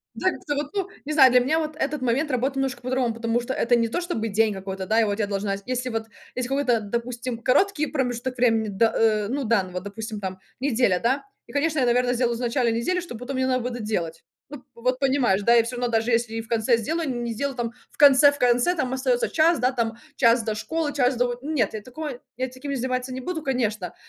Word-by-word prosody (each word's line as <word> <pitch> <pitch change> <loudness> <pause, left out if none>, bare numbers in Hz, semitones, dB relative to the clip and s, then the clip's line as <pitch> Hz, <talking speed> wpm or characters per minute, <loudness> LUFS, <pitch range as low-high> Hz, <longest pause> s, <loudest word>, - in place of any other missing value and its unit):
Да 375 - +1
как - - -10
то 290 - 0
вот, 290 0 -2
ну 390 -2 -1 0.2
не 305 - -2
знаю, 265 -4 +7
для 250 - +6
меня 305 +6 +1
вот 310 -1 -3
этот 300 -1 -2
момент 260 +5 0
работает 260 +2 0
немножко 265 -2 -2
по-другому, 255 -1 0
потому 230 +1 -1
что 245 +2 -3
это 240 -1 +2
не 230 -1 +2
то, 350 +10 -2
чтобы 285 -11 -2
день 215 +1 +2
какой-то, 190 -1 -5
да. 220 +1 +3
И - - +4
вот 205 0 -1
я 210 - +1
должна, 200 0 -1
если 255 0 -2
вот 225 -2 -3 0.3
есть 250 -1 -2
какой-то 265 -3 +1
допустим 235 +3 -4
короткий 305 - +2
промежуток 250 -2 -2
времени 225 -3 +2
д 215 +3 +2
э, 215 -2 +2
ну 275 +3 -1
данного 190 -6 0
допустим 215 +2 -6
там 190 -1 -5 0.2
неделя, 245 -8 +2
да, 265 +4 0 0.2
и - - -14
конечно 300 +1 0
я 255 - +3
наверное 245 +1 +2
сделаю 240 -1 0
вначале 245 0 0
недели 235 +11 0
что 340 -9 -7
потом 250 +3 -6
мне 260 - +1
надо 255 -1 +1
будет 245 0 -3
доделать. 175 -7 -3 0.3
Ну 290 -3 -10
вот, 235 - -15
вот 255 +1 +1
понимаешь 260 -8 +2
да. 235 +4 +4
Я 230 - +6
всё 245 +2 -5
равно 245 0 -2
даже 225 +1 +1
если 230 -1 +1
и 225 - -2
в 225 - -14
конце 230 +1 +2
сделаю, 315 +7 -2
не 240 -2 -3
сделаю 275 +3 -3
там 235 -1 -2 0.2
в - - -23
конце 285 0 +7
в 285 - -7
конце 245 +8 +3
там 260 -6 -1
остается 260 -2 +1
час 325 +2 +3
да 255 +1 +1
там 230 -2 -1 0.2
час 235 -1 +4
до 220 -1 -2
школы, 305 +6 -2
час 250 -2 +2
до 245 - +3
вот 245 +1 -4
нет, 280 -9 0
я 215 - -5
такого 290 +6 -6 0.3
я 260 - -1
таким 265 +2 -6
заниматься 255 0 -2
не 260 - -4
буду, 320 +5 -4
конечно. 220 - -1
245 Hz, 245 wpm, -24 LUFS, 225-270 Hz, 0.3 s, знаю